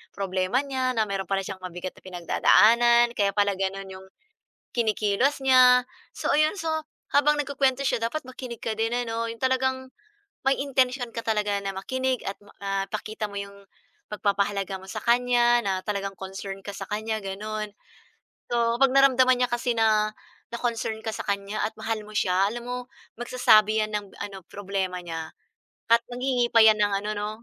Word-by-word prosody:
problema 190 +5 0
niya 260 -2 -1
na 220 - +3
mayro'n 195 -1 -3
pala 195 0 +1
siyang 190 -1 -7
mabigat 180 0 -6
na - - -18
pinagdadaanan, 235 +6 +4
kaya 200 -1 +3
pala 205 -1 +2
gano'n 195 0 -3
'yong 190 0 -12 0.7
kinikilos 220 +4 +1
niya. 250 -1 +7 0.3
So - - -3
ayon, 305 +5 +3
so, 330 - -2 0.5
habang 295 +1 +4
nagkukuwento 275 -2 0
siya 235 - 0
dapat 270 +7 -2
makinig 255 -2 -8
ka 225 - 0
din 225 +2 -1
ano, 230 -1 -2
'yong 230 - -9
talagang 260 0 0 0.5
may 270 0 +4
intensyon 255 -2 0
ka 230 - -5
talaga 210 -2 0
na 195 - -2
makinig 260 +5 -2
at 195 - -7
ma - - -17
ah, 195 -1 -1
pakita 215 +1 -4
mo 200 - -11
'yong 200 0 -12 0.5
pagpapahalaga 200 -1 -1
mo - - -12
sa - - -4
kanya 240 0 +3
na 195 - +1
talagang 200 -2 -3
concern 195 0 -6
ka 200 - -4
sa 195 - -5
kanya 220 +1 -2
gano'n. 215 +2 -4 0.8
So 235 -1 +1
kapag 270 - +6
naramdaman 260 -2 +5
niya 250 - +1
kasi 240 0 0
na 215 -1 +3 0.4
na-concern 235 -2 -2
ka 220 - -3
sa - - -5
kanya 200 +1 -2
at 220 - -7
mahal 220 -1 -3
mo 215 - -12
siya, 190 -1 +2
alam 240 +2 -6
mo 250 0 -3 0.4
magsasabi 220 -3 +4
yan 215 - -6
ng 205 -1 -2
ano, 195 -2 -7
problema 195 -2 -3
niya 165 -2 -6 0.6
at 230 0 +6
nanghihingi 245 -1 0
pa 230 - +7
'yan 220 -1 +6
ng 205 -1 +2
ano 210 - -3
'no, 210 0 -3
220 Hz, 175 wpm, -25 LUFS, 200-250 Hz, 0.8 s, niya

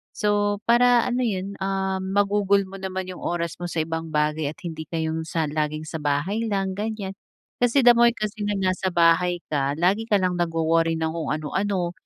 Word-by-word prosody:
So, 205 0 0
para 240 0 +5
ano 250 0 -1
'yon, 200 -3 -3
ah, 190 0 -1
magugol 200 +1 +2
mo 195 +1 -10
naman 190 0 -4
'yong 180 - -9
oras 170 -1 -2
mo 175 - -3
sa 165 -2 -1
ibang 165 0 -4
bagay 150 0 +1
at - - -14
hindi 160 -3 -6
ka 165 - -6
'yong 160 0 -2
sa 165 -1 -1
laging 155 0 -2
sa 160 +1 -5
bahay 150 +8 0
lang, 195 -2 -1
ganiyan. 210 -2 -3 0.5
Kasi, 245 +3 +3
the 240 - +9
more 235 0 +5
kasi 215 -1 -4
na 205 - 0
nasa 185 0 0
bahay 175 +1 +3
ka 140 -1 0
lagi 190 +6 +2
ka 210 - +3
lang 185 -1 0
nagwo-worry 165 -1 +1
ng 160 0 -1
kung 165 0 -3
ano-ano, 180 +4 -1
185 Hz, 195 wpm, -24 LUFS, 165-205 Hz, 0.5 s, the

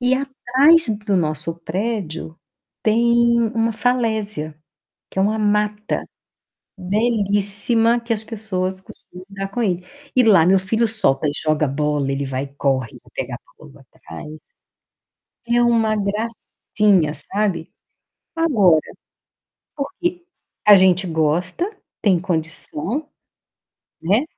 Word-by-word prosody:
E 250 +1 +2
atrás 275 +3 +3 0.2
do 200 - +2
nosso 155 -1 -1
prédio, 170 -3 -4 0.5
tem 235 +1 +3
uma 225 0 +1
falésia, 215 -10 -1 0.5
que - - -7
é - - +4
uma 215 +2 +1
mata, 210 0 0 0.7
belíssima 205 +3 +1
que 235 0 -3
as 220 -1 -2
pessoas 190 -4 -3
costumam 185 -1 -14
brincar 195 0 -6
com 240 +4 -2
ele. 180 -4 -1 0.3
E 255 - +6
lá 195 -7 +6
meu 190 +2 +5
filho 220 +5 0
solta 155 -10 +1
e - - 0
joga 155 0 +1
bola, 145 0 -1
ele 140 +1 -2
vai 135 0 -3
e 140 0 -13
corre 130 -5 0
para - - -22
pegar - - -4
a - - -24
bola 65 -1 -15
atrás. 150 - -10 1.1
É 240 +1 +2
uma 230 -2 +2
gracinha 210 -4 0
sabe? 170 +2 -3 0.6
Agora, 210 - +4 1.0
porque, 350 +5 -3 0.4
a 210 -1 +10
gente 185 -1 +4
gosta, 170 - 0 0.3
tem 185 -5 +2
condição. 175 - -1 0.9
Né. 205 - +2
200 Hz, 120 wpm, -20 LUFS, 165-230 Hz, 1.1 s, a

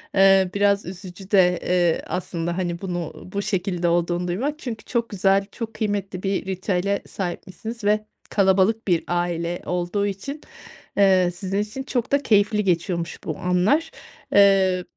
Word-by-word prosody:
Eee, 195 -1 +5
biraz 200 0 +2
üzücü 185 +1 -9
de, 180 -3 +4
eee, 175 -2 +2
aslında, 170 -1 -3
hani, 175 -1 -2
bunu 175 -4 -4 0.2
bu 200 - -1
şekilde 185 -4 -1
olduğunu 175 +1 +1
duymak. 275 +12 -2
Çünkü 235 -7 -6
çok 235 -2 -1
güzel, 195 0 +2
çok 230 -2 -6
kıymetli 200 -3 -3
bir 195 -1 -1
ritüele 190 +1 -1
sahipmişsiniz 200 +5 -6
ve 210 +1 +2 0.2
kalabalık 200 +3 +2
bir 175 -3 +2
aile 175 0 -1
olduğu 180 +3 -1
için, 240 +10 -5 0.6
eee, 185 -3 +4
sizin 190 +2 -3
için 215 +6 -4
çok 250 -4 -2
da 280 0 +2
keyifli 210 -2 +3
geçiyormuş 170 -1 -1
bu 155 - -4
anlar. 200 - +1 0.4
Eee, 195 -2 +5
195 Hz, 145 wpm, -23 LUFS, 180-205 Hz, 0.6 s, Eee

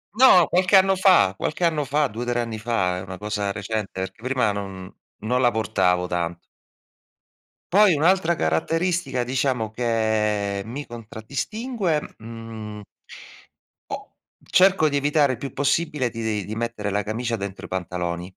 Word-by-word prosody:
No, 220 -9 +7
qualche 185 +2 +3
anno 190 0 +6
fa, 185 - +5
qualche 170 - -1
anno 155 -4 +1
fa, 150 +2 +1
2,3 120 +2 -3
anni 115 -2 -4
fa, 110 -6 0
è 90 - -4
una 95 -1 -8
cosa 105 0 -2
recente, 105 0 -3
perché 110 +4 -6
prima 125 -4 +1
non 95 -1 -6 0.3
non 125 +3 +1
la 120 - +5
portavo 90 -5 +1
tanto. 85 -1 -2 1.4
Poi 200 -4 +6
un'altra 170 +2 +3
caratteristica, 165 - 0
diciamo, 125 -3 -1
che 110 -3 0
mi 130 +7 -6
contraddistingue, 150 - -3 0.2
mhmm 110 -2 -8 1.1
o - - -7 0.4
cerco 185 -4 +5
di 145 - -2
evitare 145 -1 +2
il 120 - -6
più 135 +2 -6
possibile 145 -2 0
di 110 -4 -3
di 110 - -5
mettere 115 -2 -3
la 105 +1 0
camicia 115 +2 -2
dentro 100 -2 -6
i - - -11
pantaloni. 90 -1 -4
115 Hz, 145 wpm, -23 LUFS, 105-150 Hz, 1.4 s, No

